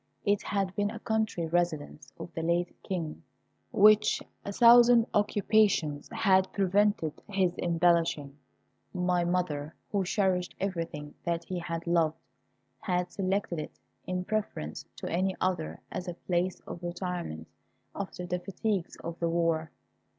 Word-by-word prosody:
It 205 0 +2
had 195 -2 -1
been 205 0 +1
a - - -6
country 220 -6 -1
residence 160 -4 -1
of - - -8
the 165 - -3
late 170 +2 0
King, 170 -5 -4 0.5
which 215 +1 +5 0.2
a 200 - -4
thousand 235 +1 +7
occupations 205 -7 +2
had 190 -2 +3
prevented 200 -4 +1
his 190 -3 +1
embellishing. 165 -4 +2 0.6
My 180 -1 +1
mother, 170 -4 -1 0.2
who 200 -2 +1
cherished 185 -1 0
everything 165 -6 -3
that 170 -1 -1
he 180 +1 -4
had 165 -1 -4
loved, 165 -2 +2 0.6
had 180 +2 -1
selected 190 -3 -1
it 150 - -7 0.3
in 180 0 -2
preference 205 - -3
to - - -6
any 185 +2 0
other 130 - -1
as 185 0 -5
a 175 - -4
place 180 +1 -1
of 170 - -8
retirement 175 - -4 0.5
after 185 -2 -5
the 180 0 -2
fatigues 195 0 -2
of 170 0 -6
the 170 - +1
war. 165 -1 +1
180 Hz, 135 wpm, -29 LUFS, 165-195 Hz, 0.6 s, thousand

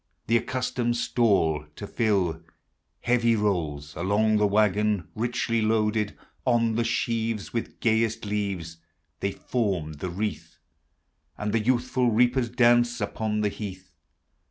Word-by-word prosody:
The 115 - +3
accustomed 120 -1 -1
stall 95 -12 +1
to 105 - -7
iill. 95 -8 0 0.6
Heavy 120 -1 +3
rolls 80 -9 -1
Alone; 105 +5 +2
the 105 0 +3
wagon, 105 -2 +2
Richly 115 0 -1
loaded. 110 -1 +1 0.3
On 115 -3 +2
the 115 +2 +1
sheaves, 115 -2 -1
With 115 - -4
gayest 115 0 +1
leai 100 -6 -3 0.4
They 100 - -1
form 95 -10 -2
the 75 +5 -5
wreath; 105 +4 -4 0.8
And 105 0 -3
the 115 - +3
youthful 125 +2 +1
reapers 120 +2 +2
dance 120 0 +3
I 105 - +1
'poll 105 +1 -2
the 105 - +1
heath. 95 -3 -8
110 Hz, 130 wpm, -26 LUFS, 100-115 Hz, 0.8 s, The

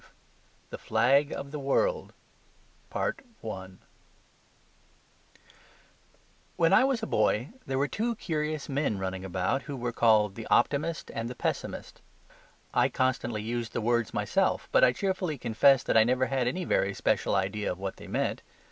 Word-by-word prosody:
V - - -21 0.6
THE - - -5
FLAG 140 +3 +3
OF 140 0 -6
THE 150 - -5
WORLD 465 - 0 1.3
When 95 -4 -7 3.0
I 195 - +7
was 265 -4 0
a - - +1
boy 110 - +1 0.2
there 135 - -1
were 140 +2 +1
two 235 +7 -2
curious 155 -6 -3
men 140 -6 -1
running 95 0 -4
about 95 +7 -1
who 140 - -4
were 120 -1 -2
called 110 -4 +3
the 115 +2 -8
optimist 160 +3 +1
and 115 +1 -3
the 125 - -7
pessimist. - - -4 0.7
I - - +3
constantly 120 -4 -1
used 115 +1 -3
the - - -1
words 120 -1 +1
myself, - - 0
but - - +4
I 125 - +7
cheerfully 185 0 -2
confess 125 +3 +4
that - - 0
I 110 - +7
never 125 +2 +2
had 130 -2 0
any 180 +8 -2
very 100 -8 +1
special - - +1
idea 100 +2 -1
of 90 - -5
what 95 0 -5
they - - -11
meant. - - -1
125 Hz, 155 wpm, -28 LUFS, 110-145 Hz, 3.0 s, I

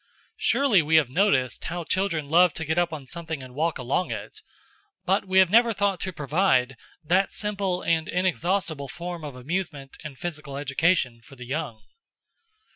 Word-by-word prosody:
Surely 255 -10 +3
we 155 +1 +1
have 150 -6 +4
noticed 135 -7 +1
how 175 +1 -3
children 170 -4 -1
love 170 +2 +5
to 160 - -4
get 160 +3 +1
up 175 -1 +1
on 150 -4 -7
something 160 -1 -6
and 130 -1 -11
walk 160 +4 0
along 130 +8 -1
it! - - -7 0.6
But 195 +2 +1
we 190 0 +1
have 190 -2 +6
never 230 +1 +5
thought 200 -3 0
to 185 - -3
provide 150 -5 +1 0.3
that 185 +5 +2
simple 200 -3 -2
and 160 -1 +1
inexhaustible 180 -4 -1
form 175 +2 -6
of 145 -3 -7
amusement 140 0 -4
and 150 -4 -8
physical 150 -4 -5
education 140 -3 +1
for 135 +4 -16
the 125 -1 -10
young. 120 -5 -4
165 Hz, 170 wpm, -25 LUFS, 140-185 Hz, 0.6 s, have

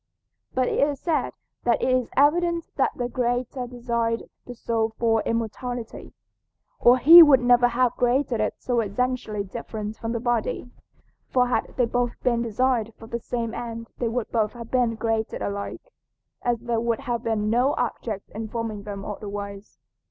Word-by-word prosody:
But 255 -1 +2
it - - -1
is 285 -1 +1
said 325 -3 0 0.3
that 240 -1 +2
it - - 0
is 255 -2 +1
evident 335 +4 +3
that 270 - +2
the 245 - -2
Creator 245 +1 -2
designed 235 -2 -2 0.2
the 245 - -7
soul 225 -1 -1
for 225 -1 +2
immortality, 230 +1 -4 0.6
or 245 +1 +6
he 330 +7 +10
would 290 -5 +8
never 245 0 +5
have 245 0 +1
created 250 -1 +1
it 215 - 0
so 245 -2 -1
essentially 225 -1 -1
different 215 +1 -6
from 225 - -4
the 235 - -1
body, 240 0 -1 0.6
for 250 -1 +2
had - - -1
they 250 - +4
both 245 +1 -1
been 235 -2 +2
designed 235 -1 0
for 225 - -12
the 235 +1 -4
same 230 -1 -3
end 230 -1 -6
they 240 - 0
would 230 0 -3
both 220 -3 +1
have 235 -1 -10
been 240 -3 +1
created 225 -1 -1
alike, 200 - -5 0.5
as 240 -2 0
there 235 -1 -1
would 235 +1 -1
have 240 -4 -2
been 220 -3 -1
no 250 +5 +2
object 225 -4 -3
in 220 +1 -5
forming 225 -2 -4
them 200 -1 -7
otherwise. 205 -1 -7
235 Hz, 170 wpm, -25 LUFS, 225-250 Hz, 0.6 s, he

